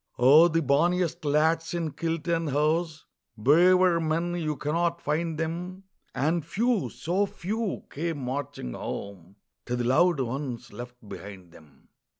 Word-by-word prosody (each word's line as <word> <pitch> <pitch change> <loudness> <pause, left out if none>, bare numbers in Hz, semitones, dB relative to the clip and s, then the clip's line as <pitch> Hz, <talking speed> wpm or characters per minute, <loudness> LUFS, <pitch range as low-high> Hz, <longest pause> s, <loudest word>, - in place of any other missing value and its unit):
Oh, 145 +7 +7
the 165 -1 0
bonniest 170 +4 +1
lads 160 +3 +1
in 165 -3 -2
kilt 165 +3 -3
and 165 -2 0
hose 155 +3 0 0.3
Braver 175 +8 +5
men, 165 +2 -1
you 155 -3 -2
cannot 170 +4 -1
find 160 +2 -2
them 175 +4 -4 0.3
And 155 +5 +1
few, 220 - 0
so 190 +5 -1
few, 210 +3 -3
came 165 +1 -3
marching 130 - -4
home 100 -2 -7 0.3
To 125 - -1
the 120 - -1
loved 150 +6 +3
ones 130 0 -4
left 120 -2 -10
behind 95 -2 -10
them. 80 -3 -19
160 Hz, 140 wpm, -27 LUFS, 135-170 Hz, 0.3 s, Oh